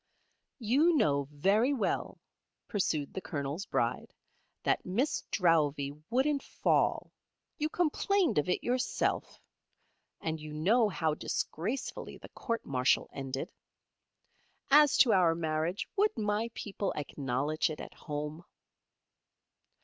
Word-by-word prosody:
"You 280 Hz, +8 st, +3 dB
know 140 Hz, -, +2 dB
very 200 Hz, -, +2 dB
well," 235 Hz, -, -1 dB, 0.5 s
pursued 155 Hz, -9 st, -1 dB
the 190 Hz, -, -4 dB
Colonel's 145 Hz, +4 st, -4 dB
Bride, -, -, -1 dB, 0.5 s
"that -, -, +1 dB
Miss 235 Hz, +11 st, 0 dB
Drowvey 150 Hz, -6 st, +2 dB, 0.2 s
wouldn't 275 Hz, +4 st, +2 dB
fall. -, -, +1 dB, 0.5 s
You 305 Hz, +1 st, 0 dB
complained 355 Hz, -, +1 dB
of 150 Hz, -, -1 dB
it 180 Hz, -, 0 dB
yourself. 250 Hz, +1 st, -1 dB, 0.8 s
And 160 Hz, 0 st, -3 dB
you 155 Hz, 0 st, -8 dB
know 210 Hz, +9 st, +3 dB
how 160 Hz, -3 st, 0 dB
disgracefully 185 Hz, -, -3 dB
the -, -, -12 dB
court 230 Hz, -2 st, -4 dB
martial 130 Hz, -1 st, +1 dB
ended. 135 Hz, -1 st, -4 dB, 1.2 s
As 295 Hz, 0 st, +7 dB
to 235 Hz, -5 st, +6 dB
our 175 Hz, -4 st, +4 dB
marriage; 160 Hz, +2 st, -1 dB
would 415 Hz, -4 st, +2 dB
my 210 Hz, +1 st, 0 dB
people 200 Hz, -1 st, -3 dB
acknowledge 145 Hz, +2 st, -1 dB
it 155 Hz, -, -6 dB
at -, -, -8 dB
home?" 150 Hz, +2 st, -5 dB
180 Hz, 115 wpm, -31 LUFS, 150-240 Hz, 1.2 s, As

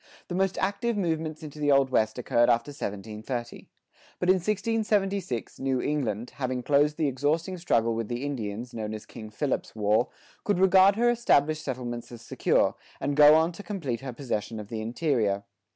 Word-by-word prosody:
The -, -, -4 dB
most 190 Hz, +1 st, 0 dB
active 210 Hz, +4 st, -1 dB
movements 160 Hz, -4 st, -2 dB
into 150 Hz, 0 st, -9 dB
the 145 Hz, -1 st, +2 dB
Old 135 Hz, -1 st, +4 dB
West 110 Hz, -2 st, +1 dB
occurred 120 Hz, -1 st, +2 dB
after 120 Hz, +5 st, +2 dB
1730. 110 Hz, 0 st, -6 dB, 0.5 s
But 180 Hz, -, -1 dB
in 185 Hz, -, +6 dB
1676 200 Hz, -, -1 dB
New 135 Hz, -1 st, 0 dB
England, 125 Hz, -6 st, -2 dB
having 130 Hz, -2 st, -2 dB
closed 145 Hz, +2 st, +3 dB
the 155 Hz, -, +1 dB
exhausting 150 Hz, +7 st, 0 dB
struggle 115 Hz, -9 st, +1 dB
with 115 Hz, -1 st, -3 dB
the 120 Hz, +4 st, -3 dB
Indians, 120 Hz, -3 st, -4 dB
known 110 Hz, -1 st, -4 dB
as 110 Hz, -, -9 dB
King 110 Hz, -1 st, -10 dB
Philip's 130 Hz, +4 st, -2 dB
War, 105 Hz, +2 st, +2 dB, 0.4 s
could 205 Hz, -, +1 dB
regard 190 Hz, +1 st, +6 dB
her 240 Hz, +2 st, +3 dB
established 155 Hz, -10 st, +2 dB
settlements 120 Hz, -3 st, -5 dB
as 120 Hz, -, -10 dB
secure, -, -, +2 dB, 0.3 s
and 140 Hz, +1 st, -1 dB
go 150 Hz, +1 st, +8 dB
on 160 Hz, +2 st, +3 dB
to 175 Hz, -, -10 dB
complete 165 Hz, -, -4 dB
her 135 Hz, -1 st, -5 dB
possession 115 Hz, -3 st, -4 dB
of 105 Hz, -1 st, -8 dB
the 110 Hz, -2 st, -4 dB
interior. 110 Hz, -5 st, 0 dB
140 Hz, 175 wpm, -27 LUFS, 115-170 Hz, 0.5 s, go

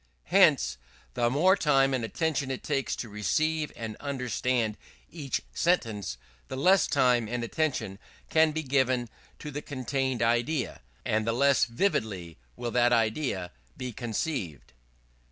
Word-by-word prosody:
Hence, 65 Hz, -1 st, +5 dB, 0.3 s
the 120 Hz, -, +1 dB
more 170 Hz, +9 st, +4 dB
time 135 Hz, -6 st, +3 dB
and 130 Hz, -3 st, 0 dB
attention 145 Hz, +3 st, -1 dB
it 130 Hz, -, -4 dB
takes 140 Hz, -3 st, -1 dB
to 120 Hz, -, -5 dB
receive 150 Hz, -, 0 dB
and 110 Hz, -2 st, -5 dB
understand 125 Hz, -4 st, -1 dB, 0.4 s
each 145 Hz, -6 st, -3 dB
sentence, 115 Hz, -, 0 dB, 0.3 s
the 130 Hz, -, -5 dB
less 185 Hz, +5 st, +4 dB
time 120 Hz, -3 st, +3 dB
and 120 Hz, +1 st, -3 dB
attention 115 Hz, -7 st, -2 dB, 0.3 s
can 160 Hz, 0 st, +4 dB
be 160 Hz, +1 st, -3 dB
given 130 Hz, -3 st, +1 dB, 0.3 s
to 150 Hz, -, -7 dB
the 145 Hz, +1 st, -4 dB
contained 130 Hz, -3 st, -2 dB
idea; 120 Hz, +4 st, 0 dB, 0.2 s
and 110 Hz, +1 st, 0 dB
the 115 Hz, -, +2 dB
less 140 Hz, +3 st, +4 dB
vividly 110 Hz, -, -2 dB, 0.2 s
will 120 Hz, -1 st, -4 dB
that 120 Hz, 0 st, +3 dB
idea 110 Hz, -5 st, 0 dB, 0.3 s
be 125 Hz, -1 st, -4 dB
conceived. 110 Hz, -, -4 dB
125 Hz, 135 wpm, -28 LUFS, 115-145 Hz, 0.4 s, Hence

